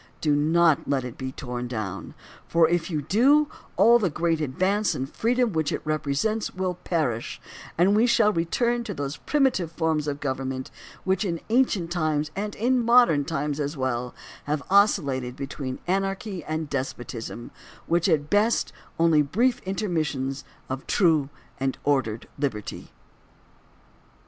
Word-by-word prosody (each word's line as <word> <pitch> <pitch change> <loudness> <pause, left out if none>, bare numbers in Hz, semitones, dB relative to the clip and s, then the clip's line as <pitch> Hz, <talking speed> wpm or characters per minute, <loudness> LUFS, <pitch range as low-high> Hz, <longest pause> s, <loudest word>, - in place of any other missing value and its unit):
Do 150 -2 +2
not 160 +1 +3
let 135 -2 +1
it 125 -2 -6
be 130 -1 -5
torn 125 -2 -5
down, 110 -6 -5 0.3
for 165 -1 +4
if 170 +1 0
you 155 -4 -2
do 280 - +4 0.3
all 230 +6 +6
the 195 -5 +1
great 165 +1 0
advance 185 +8 0
in 130 - -2
freedom 235 - 0
which 160 -2 0
it - - -3
represents 155 +9 -1
will 185 -1 -1
perish 155 -10 -2 0.4
and 185 +4 +4
we 225 +3 +4
shall 225 -3 +4
return 235 +8 0
to 205 - -5
those 140 +1 -4
primitive 265 - +1
forms 160 -3 0
of 145 -1 -2
govern 135 -2 -2
ment 130 0 -5 0.3
which 190 +3 +1
in 170 -4 -2
ancient 220 -9 +2
times 155 -3 0
and 205 +1 -3
in 245 +2 +1
modern 235 - +5
times 150 -1 -2
as 145 +1 -2
well 125 -2 -2 0.3
have 145 -1 -1
oscillated 140 -11 +3
between 135 -1 -5
anarchy 195 +1 -2
and 155 0 -3
despotism, 120 -4 -5 0.4
with 170 +2 +2
at 150 -5 +2
best 210 +6 +2 0.2
only 165 -2 +4
brief 235 - +1
intermissions 155 -9 -2 0.2
of 130 0 -5
true 160 -7 +3 0.3
and 135 0 -1
or 145 -2 +3
dered 110 -2 -6 0.2
liberty. 110 -8 -4
160 Hz, 150 wpm, -25 LUFS, 140-200 Hz, 0.4 s, all